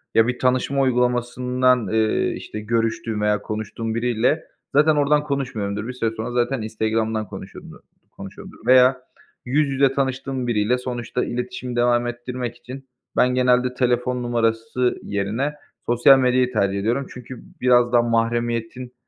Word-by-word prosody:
Ya 115 0 +5
bir 125 0 -2
tanışma 130 +2 +1
uygulamasından, 125 -1 +1
eee, 110 0 +1
işte, 105 - -7
görüştüğüm 115 +1 -1
veya 105 -1 +1
konuştuğum 110 +1 -4
biriyle 125 +6 +1 0.3
zaten 150 +1 +5
oradan 145 +1 +2
konuşmuyorumdur, 115 -7 -3
bir 125 - -5
süre 115 -3 -1
sonra 115 +2 -4
zaten 120 0 0
Instagram'dan 110 0 -1
konuşuyumdur 95 0 -10 0.3
konuşuyorumdur 100 0 -11
veya 130 0 +5 0.4
yüz 140 +3 +1
yüze 135 0 +2
tanıştığım 135 -1 -2
biriyle 115 +2 +1
sonuçta 125 -1 -3
iletişimi 125 0 -5
devam 120 0 +2
ettirmek 120 0 -5
için 130 +2 -11 0.3
ben 125 0 +3
genelde 125 0 +2
telefon 125 0 0
numarası 115 +1 0
yerine 105 +9 -2 0.3
sosyal 130 +3 +5
medyayı 125 0 +2
tercih 100 -2 +1
ediyorum. 120 +6 -1
Çünkü 125 0 -10 0.2
biraz 120 -1 +4
daha 120 - +6
mahremiyetin, 120 +1 -1
120 Hz, 135 wpm, -22 LUFS, 115-125 Hz, 0.4 s, daha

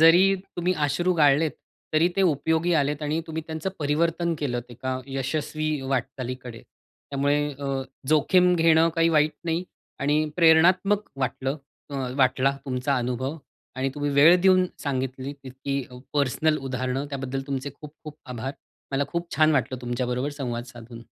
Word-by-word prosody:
जरी 165 +3 +8 0.3
तुम्ही 175 +1 +1
अश्रू 175 +6 +1
गाळलेत 150 0 +4 0.4
तरी 155 +3 +4
ते 195 - +3
उपयोगी 160 +1 +2
आलेत 145 0 +1
आणि 150 +2 0
तुम्ही 160 0 -4
त्यांचं 160 +4 -3
परिवर्तन 165 +3 +1
केलंत 120 -4 -3
एका 130 +2 -4
यशस्वी 140 +3 -2 0.3
वाटचालीकडे. 125 -2 -4 0.5
त्यामुळे 140 +1 +1 0.2
अ, 135 -1 -2 0.3
जोखीम 180 +4 +4
घेणं 165 -1 +5
काही 165 0 +3
वाईट 155 -1 +3
नाही 165 +2 -1 0.4
आणि 145 +2 +2 0.2
प्रेरणात्मक 180 +5 +4
वाटलं 135 +2 -2 0.3
अ, 140 - -6 0.2
...वाटला 130 0 +3
तुमचा 135 +1 -1
अनुभव 125 +4 -2 0.4
आणि 130 +1 0
तुम्ही 145 0 -1
वेळ 155 +6 +8
देऊन 185 0 +5 0.2
सांगितली 130 -1 -3
इतकी 135 +1 -3
अ, 125 - -11 0.2
पर्सनल 145 +2 +2
उदाहरणं 130 +1 -2
त्याबद्दल 135 -1 -3
तुमचे 140 0 -3
खूप 150 -1 -10
खूप 150 -1 -8
आभार. 125 +1 -4 0.4
मला 135 +1 +1
खूप 170 0 -3
छान 155 0 +5
वाटलं 130 -2 0
तुमच्याबरोबर 125 +2 -2
संवाद 120 -3 -3
साधून. 120 -2 -11
145 Hz, 145 wpm, -25 LUFS, 130-160 Hz, 0.5 s, जरी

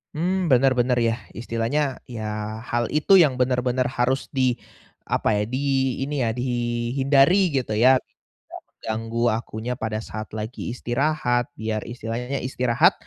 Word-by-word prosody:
Mmm, 180 +4 0
benar 130 -3 +4
benar 125 0 +2
ya, 115 0 +1 0.2
istilahnya, 120 +5 -1
ya, 110 -2 -5
hal 120 0 +1
itu 175 +6 +5
yang 155 -7 +5
benar-benar 125 0 +1
harus 130 +2 0
di 130 -3 +2 0.6
apa - - +1
ya, 105 0 +1
di 130 - -2 0.5
ini 145 -1 -2
ya, 115 - +1
dihindari, 130 +8 +2
gitu 130 -6 -1
ya? 125 +5 +6 0.5
Nggak - - -10 0.2
menganggu 115 +1 -2
akunya 115 +1 -4
pada 110 -3 -3
saat 110 0 -6
lagi 110 +4 -5
istirahat, 125 -1 0
biar 110 -1 -2
istilahnya, 120 +3 -4
istirahat, 130 +7 +3
125 Hz, 140 wpm, -23 LUFS, 115-135 Hz, 0.6 s, ya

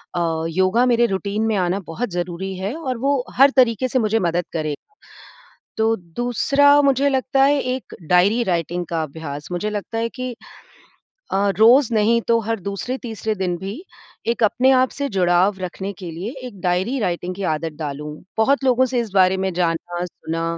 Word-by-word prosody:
अ, 165 -2 -1
योगा 190 +8 +2
मेरे 240 -1 +3
रूटीन 200 +1 -2
में 220 - +1
आना 185 +1 0
बहुत 215 +8 -3
ज़रूरी 180 +2 -4
है 195 +7 -3
और 265 -7 -3
वो 270 +1 0
हर 275 +2 +8
तरीके 255 -1 +3
से 255 - 0
मुझे 220 -1 +1
मदद 175 -2 0
करे। 155 -2 -2 1.0
तो 225 +1 +3 0.2
दूसरा 280 +4 +4
मुझे 275 0 +3
लगता 270 0 +1
है 285 +1 +3
एक 255 0 -4
डायरी 200 +7 +4
राइटिंग 175 -1 -1
का 165 -1 -2
अभ्यास। 145 -2 -7
मुझे 205 +4 -2
लगता 210 +2 -4
है 230 - 0
कि 255 0 -6 1.0
अ, 200 +1 +2
रोज़ 240 +4 +6
नहीं 225 +2 +3
तो 230 0 +4
हर 225 -2 -1
दूसरे-तीसरे 220 +3 -4
दिन 185 -2 -1
भी 190 +2 -6 0.6
एक 235 0 0
अपने 250 +5 +3
आप 255 - +3
से 280 -1 -3
जुड़ाव 185 +1 +2
रखने 190 +2 -5
के 180 -3 -6
लिए 180 +8 -5 0.2
एक 205 -6 -12
डायरी 185 +9 0
राइटिंग 180 -3 -2
की 195 - -5
आदत 160 +1 -3
डालूँ। 150 0 -5 0.3
बहुत 275 +5 +2
लोगों 260 -1 +4
से 255 -1 -1
इस 230 -3 -3
बारे 190 -1 +4
में 190 - 0
जाना, 175 0 -1
सुना 165 -1 -5
205 Hz, 180 wpm, -21 LUFS, 175-245 Hz, 1.0 s, हर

